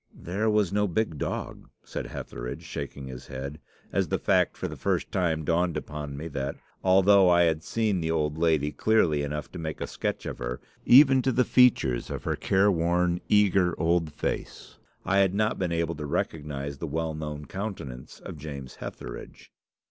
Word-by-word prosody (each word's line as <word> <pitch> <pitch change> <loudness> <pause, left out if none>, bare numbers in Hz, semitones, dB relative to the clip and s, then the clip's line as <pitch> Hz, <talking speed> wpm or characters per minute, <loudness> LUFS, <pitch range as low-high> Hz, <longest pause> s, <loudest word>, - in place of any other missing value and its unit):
"'There 100 +6 -1
was 105 -3 +2
no 105 0 +2
big 90 -5 -1
dog,' - - -4
said - - -5
Hetheridge, 60 +6 -6
shaking 70 -3 -6
his 65 -2 -9
head, 70 +3 -6 0.3
as - - +1
the - - 0
fact - - +2
for - - -3
the - - -7
first - - -1
time 80 -4 0
dawned 85 0 +1
upon 75 -2 -6
me 80 +3 -5
that, 70 -1 -3 0.3
although 95 0 +6
I 85 0 +5
had 80 -2 +1
seen 105 -2 0
the 80 - -1
old 75 -2 0
lady 80 -3 +2
clearly 85 -10 +2
enough 75 +1 -4
to 90 - -7
make 80 -1 -4
a - - -2
sketch - - -3
of - - -5
her, - - -4 0.3
even 135 0 +8
to 130 - +1
the 125 0 +2
features 110 - +3
of - - -5
her - - -1
care 100 +2 +3
worn, 85 0 +1
eager 95 -4 +3
old 85 -1 +1
face, 75 - -5 0.3
I 100 +1 +3
had 95 -1 +3
not 110 +1 +1
been 90 -3 -1
able 85 0 0
to 75 -2 -6
recognise 70 -2 -3
the 85 - -3
well 80 +2 -2
known 75 -1 -5
countenance 90 - -6
of 75 - -8
James 70 -3 -8
Hetheridge. - - -9
80 Hz, 185 wpm, -27 LUFS, 75-95 Hz, 0.3 s, even